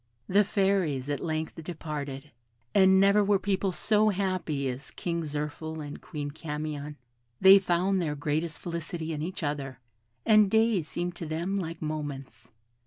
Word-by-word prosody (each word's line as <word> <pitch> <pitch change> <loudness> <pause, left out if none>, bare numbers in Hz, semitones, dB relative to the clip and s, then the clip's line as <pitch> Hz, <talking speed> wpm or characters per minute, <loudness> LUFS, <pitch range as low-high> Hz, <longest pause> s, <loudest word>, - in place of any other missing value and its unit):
The 200 +3 +4
Fairies 190 -9 0
at 145 - -1
length 160 0 -3
departed, 150 -4 -6 0.4
and 190 -1 +6
never 200 +2 +5
were 200 0 +3
people 195 0 0
so 215 +3 +3
happy 185 -8 -1
as 130 +2 -4
King 170 -1 -3
Zirphil 150 +1 -4
and 145 -1 -7
Queen 145 -3 -5
Camion. 150 -1 -5 0.4
They 190 +1 +9
found 185 +1 +1
their 150 -3 -1
greatest 155 +3 -2
felicity 165 -1 -4
in 150 - -4
each 180 +3 -4
other: 140 -4 -3 0.5
and 215 -2 +6
days 220 -6 +2
seemed 175 +1 -3
to 165 - -5
them 170 +5 -2
like 165 -4 -4
moments. 140 -7 -5
165 Hz, 150 wpm, -28 LUFS, 150-190 Hz, 0.5 s, They